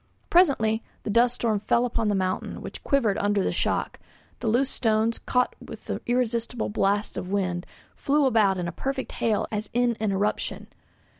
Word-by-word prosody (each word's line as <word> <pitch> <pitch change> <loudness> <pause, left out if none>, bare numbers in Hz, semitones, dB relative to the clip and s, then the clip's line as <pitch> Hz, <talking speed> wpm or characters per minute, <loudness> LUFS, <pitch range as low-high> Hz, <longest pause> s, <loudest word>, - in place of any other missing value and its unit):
Presently 250 -11 +4 0.2
the 210 - -2
dust 240 +3 +4
storm 220 -3 0
fell 235 +4 +2
upon 230 -2 -1
the 205 - +2
mountain, 185 -1 -2
which - - -8
quivered 235 -8 +2
under 205 -1 +1
the - - 0
shock; - - -1 0.4
the 235 - -3
loose 255 +5 +2
stones, 225 0 +1
caught 250 0 0
with - - -10
the - - -4
irresistible 240 -1 0
blasts 205 0 0
of 180 - -4
wind, 185 -3 -1 0.3
flew 290 +1 +2
about 215 -7 +3
in 175 -1 -2
a - - -3
perfect 270 - -4
hail 220 -3 0
as 210 -1 -3
in 240 0 +2
an 215 -2 0
eruption. 200 +2 -1
220 Hz, 175 wpm, -26 LUFS, 205-245 Hz, 0.4 s, Presently